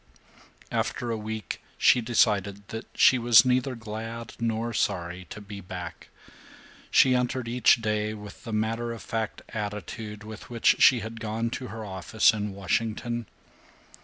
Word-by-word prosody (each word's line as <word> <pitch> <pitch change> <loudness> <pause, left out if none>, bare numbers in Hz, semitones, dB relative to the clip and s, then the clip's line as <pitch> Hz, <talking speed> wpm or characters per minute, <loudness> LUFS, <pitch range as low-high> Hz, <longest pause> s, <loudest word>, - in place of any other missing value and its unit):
After 120 -1 -1
a - - 0
week 110 0 -5 0.2
she 125 - +5
decided 105 -3 +1
that 110 +1 -6
she 130 - +6
was 120 +1 +7
neither 125 +1 +1
glad 115 +1 -6
nor 115 0 -1
sorry 90 -3 -1
to 105 - -9
be 100 -1 -9
back. 90 -2 -8 0.8
She 130 - +5
entered 125 0 0
each 120 -1 +4
day 105 0 0
with 105 -1 -11
the 115 - -6
matter 115 +2 -1
of 115 - -9
fact 110 -2 -3
attitude 105 0 -5
with 110 0 -10
which 120 -2 +3
she 125 -4 +6
had 110 +1 -7
gone 115 +1 -2
to 125 - -4
her 110 +1 -7
office 100 +4 +2
in 105 -1 -3
Washington. 110 +4 -2
110 Hz, 150 wpm, -27 LUFS, 105-115 Hz, 0.8 s, was